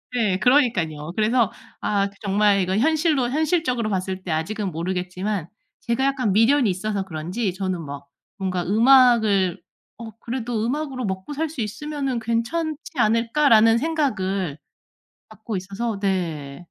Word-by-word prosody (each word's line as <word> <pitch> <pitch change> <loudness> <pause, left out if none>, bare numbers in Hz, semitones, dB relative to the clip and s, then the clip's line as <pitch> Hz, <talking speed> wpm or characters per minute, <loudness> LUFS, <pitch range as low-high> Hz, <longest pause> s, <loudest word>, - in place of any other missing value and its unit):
예. 210 -6 +1
그러니깐요. 175 - +2
그래서 225 +1 +2 0.3
아 200 -1 +1
그 200 - -22
정말 205 0 +3
이건 190 +3 0
현실로 305 -3 +2
현실적으로 295 -6 0
봤을 190 -1 -3
때 175 - -4
아직은 190 +5 -2
모르겠지만 180 +2 -3 0.3
제가 235 +2 -1
약간 260 -6 +1
미련이 230 +3 +4
있어서 195 +2 -2
그런지 180 +4 -3
저는 185 -2 -3
막 140 0 -8 0.3
뭔가 185 -2 -2
음악을 220 -5 +4 0.4
'어 225 0 -8
그래도 235 -2 -3
음악으로 270 -1 -2
먹고살 275 +12 -3
수 290 -6 -5
있으면은 275 +3 -3
괜찮지 255 +8 -1 0.2
않을까.'라는 230 0 +4
생각을 200 - -1 0.7
갖고 220 -1 -6
있어서 200 +3 -4
네. 165 -8 -2
215 Hz, 315 characters per minute, -23 LUFS, 185-250 Hz, 0.7 s, 미련이